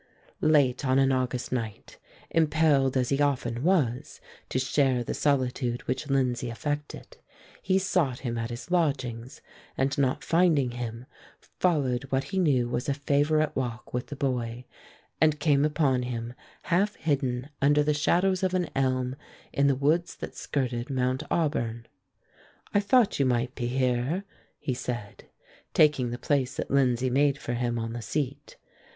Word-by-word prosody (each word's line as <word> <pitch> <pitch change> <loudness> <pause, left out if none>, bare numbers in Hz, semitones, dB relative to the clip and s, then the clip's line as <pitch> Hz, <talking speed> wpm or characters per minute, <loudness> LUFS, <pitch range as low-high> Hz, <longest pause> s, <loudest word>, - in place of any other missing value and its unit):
Late 145 -4 +3
on 130 -1 +2
an 135 0 +4
August 130 -1 -1
night, 115 -4 -5 0.3
impelled 150 -4 +3
as 125 -1 +1
he 140 +1 +1
often 125 -4 0
was 145 -8 0 0.3
to - - -1
share 130 -1 +2
the - - -3
solitude 130 -3 0
which 135 +3 -3
Lindsay 125 -2 0
affected, 145 +6 -5 0.4
he 190 0 +2
sought 180 -9 0
him 120 -3 -3
at 115 0 -3
his 120 +7 -8
lodgings, 130 -8 -1 0.4
and 135 +1 +1
not 130 -2 +1
finding 165 -7 +3
him, 120 0 -6 0.3
followed 140 -8 0
what 135 0 0
he 190 - +1
knew 135 -9 +2
was 120 +4 -2
a 140 - +1
favorite 145 +2 +1
walk 120 -3 -4
with 125 0 -2
the 145 - -6
boy, 125 -3 -2 0.6
and 155 -1 +4
came 145 -2 +3
upon 150 -4 +2
him 120 -1 -4 0.3
half 195 +5 +1
hidden 135 -4 -1
under 145 +1 +4
the 150 +1 +2
shadows 180 +5 +2
of 185 -1 0
an 180 -2 -1
elm 130 -1 0 0.4
in 140 0 +3
the 140 - +3
woods 155 +6 +1
that - - -8
skirted 125 -3 -2
Mount 130 0 0
Auburn. 120 -8 -1 0.9
"I 205 - +4
thought 205 - +3
you 135 - +3
might 125 0 0
be 120 -3 -3
here," 130 +7 0 0.3
he 140 -4 -3
said, 120 -4 -6 0.5
taking 145 -5 +4
the 120 - -4
place 135 -1 0
that - - -4
Lindsay 130 -2 +2
made 140 +1 +3
for 120 - -4
him 120 0 -1
on 115 0 -3
the 120 - -5
seat. 140 +4 -4
135 Hz, 155 wpm, -27 LUFS, 125-150 Hz, 0.9 s, an